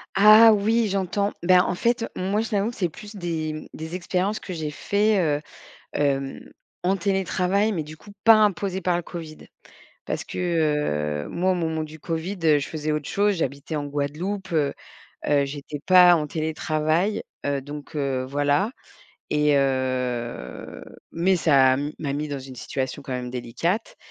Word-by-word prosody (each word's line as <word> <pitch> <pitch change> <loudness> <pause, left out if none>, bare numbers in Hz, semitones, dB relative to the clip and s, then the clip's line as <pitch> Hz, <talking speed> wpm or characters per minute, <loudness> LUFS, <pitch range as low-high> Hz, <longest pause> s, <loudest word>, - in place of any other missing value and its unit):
Ah 215 +3 +9
oui, 220 +2 +2
j'entends. 200 +1 -1
Bah 180 0 +6
en - - -1
fait, 235 +4 +1
heu, - - -4
moi, 195 +4 0
je 225 - -4
t'avoue 210 +2 0
que - - -14
c'est 180 -4 0
plus 210 +6 -11
des, 165 -4 -3
mmh, 155 - -8
des 160 +2 -6
expériences 185 +3 -1
que 185 - -7
j'ai 155 -2 -4
fait, 205 +5 +1
heu, 150 -2 +1 0.5
hem, 135 -2 -1 0.4
en 190 +2 +2
télétravail, 195 +2 +1
mais 165 -5 -2
du 155 +1 -10
coup 205 +4 -15
pas 225 -1 +9
imposées 200 -2 +1
par 175 -1 +1
le 175 - -2
COVID. 160 -2 -8 0.7
Parce - - -3
que, - - -8 0.9
heu, - - -10
moi 185 +2 +1
au - - +1
moment 160 -2 -1
du 155 0 -10
COVID, 165 +6 -3
heu, 150 -2 +6
je 140 - -4
faisais 155 -1 -3
autre 150 -2 -3
chose, 205 0 +2
j'habitais 140 0 -3
en 145 -1 -2
Guadeloupe, 165 +7 -3
heu 150 -3 +1 0.5
heu, 145 -1 +3
j'étais 145 +1 -6
pas 180 -1 +8
en 150 -2 -1
télétravail, 155 +4 0 0.2
heu, 140 -1 0
donc 145 +2 -9
heu, 135 -3 -1
voilà 145 - +1 0.6
et 150 -1 +3
heu, 125 - -2 0.3
mais 180 +3 +2
ça 135 -5 +4 0.2
m'a 145 -3 -3
mis 150 +1 -3
dans 145 -1 -3
une 130 0 -10
situation 130 +3 -4
quand 135 -2 -6
même 125 -1 -3
délicate. 165 - -2
160 Hz, 175 wpm, -24 LUFS, 145-195 Hz, 0.9 s, Ah